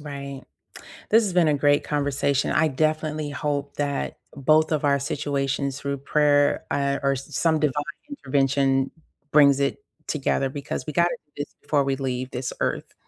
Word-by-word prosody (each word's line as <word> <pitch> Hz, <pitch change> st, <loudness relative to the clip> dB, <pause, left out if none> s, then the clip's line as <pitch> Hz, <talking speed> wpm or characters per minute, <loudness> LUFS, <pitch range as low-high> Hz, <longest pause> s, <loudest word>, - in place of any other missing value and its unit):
Right. 140 Hz, -2 st, -7 dB, 0.7 s
This 225 Hz, +2 st, +6 dB
has 200 Hz, -4 st, -1 dB
been 175 Hz, -3 st, +4 dB
a 150 Hz, -, +3 dB
great 145 Hz, 0 st, +3 dB
conversation, 140 Hz, -1 st, 0 dB
I 160 Hz, -, +3 dB
definitely 155 Hz, +1 st, -1 dB
hope 145 Hz, 0 st, -3 dB
that 145 Hz, -1 st, -2 dB, 0.2 s
both 155 Hz, +3 st, +3 dB
of 150 Hz, -1 st, 0 dB
our 140 Hz, -1 st, +3 dB
situations 140 Hz, -1 st, -2 dB
through 140 Hz, -1 st, -3 dB
prayer, 145 Hz, 0 st, +2 dB
a 140 Hz, -1 st, 0 dB
or 140 Hz, 0 st, +2 dB
some 155 Hz, +4 st, 0 dB
divine 145 Hz, -1 st, 0 dB, 0.2 s
intervention 135 Hz, -, +1 dB, 0.4 s
brings 140 Hz, -2 st, +6 dB
it 140 Hz, -, 0 dB, 0.3 s
together 135 Hz, -2 st, 0 dB
because 140 Hz, -2 st, -5 dB
we 150 Hz, -, -4 dB
gotta 170 Hz, +2 st, +2 dB
do 145 Hz, -, -44 dB
this -, -, -31 dB
before 145 Hz, -2 st, +1 dB
we 135 Hz, 0 st, 0 dB
leave 130 Hz, -1 st, -3 dB
this 125 Hz, -1 st, -4 dB
Earth. -, -, -2 dB
140 Hz, 160 wpm, -24 LUFS, 140-150 Hz, 0.7 s, This